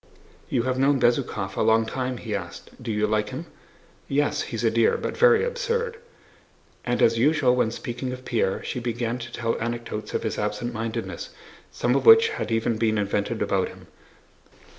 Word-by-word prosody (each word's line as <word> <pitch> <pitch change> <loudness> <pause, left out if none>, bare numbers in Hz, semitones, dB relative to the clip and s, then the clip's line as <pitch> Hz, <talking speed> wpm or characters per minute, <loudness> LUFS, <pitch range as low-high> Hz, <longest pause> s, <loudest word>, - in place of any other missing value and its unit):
"You 120 - +1
have 130 0 -1
known 135 0 +3
Bezúkhov 110 -5 0
a - - -1
long 110 0 +4
time?" 125 +2 -3
he 110 -3 -5
asked. 90 -4 -6
"Do 120 -2 -4
you 105 0 +1
like 105 0 0
him?" - - -6 0.6
"Yes, 145 +1 +1
he's 115 -1 -4
a 115 - +3
dear, 115 0 +3
but - - -4
very 465 -1 +5
absurd." 475 -1 -2 0.9
And 120 0 0
as 115 0 +4
usual 140 -1 +3
when 125 -3 +2
speaking 125 +2 -5
of 130 0 -8
Pierre, 110 -5 0
she - - -3
began 120 0 -2
to 120 0 -7
tell 115 -1 -1
anecdotes 115 -2 -4
of - - -1
his - - -2
absent 105 +3 -2
mindedness, 115 0 -4 0.4
some - - 0
of - - 0
which 450 0 +9
had 420 - -4
even 115 0 +1
been 110 -1 +2
invented 100 0 -1
about - - +1
him. - - -13
120 Hz, 185 wpm, -25 LUFS, 110-130 Hz, 0.9 s, which